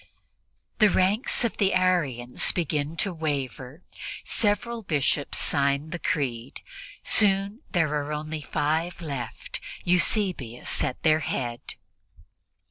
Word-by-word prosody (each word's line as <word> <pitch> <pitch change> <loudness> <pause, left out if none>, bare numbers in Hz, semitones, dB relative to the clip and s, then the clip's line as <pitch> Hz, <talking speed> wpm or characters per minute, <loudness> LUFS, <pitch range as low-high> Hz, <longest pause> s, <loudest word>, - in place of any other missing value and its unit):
The 215 -2 +6
ranks 200 +8 +2
of 225 - -2
the 195 -2 +2
Arians 145 -10 +1
begin 155 -2 -2
to 195 0 +1
waver; 145 -2 -4 0.4
several 225 +2 0
Bishops 145 -5 0
sign 140 +1 +1
the 175 - -4
Creed; 135 -7 -3 0.4
soon 200 +1 +4
there 165 -6 +1
are 150 0 -2
only 155 +1 -4
five 160 +5 -1
left 140 -9 -5 0.2
Eusebius 180 - +1
at 125 - -3
their 155 -1 +4
head. 120 -6 -4
155 Hz, 110 wpm, -26 LUFS, 140-185 Hz, 0.4 s, The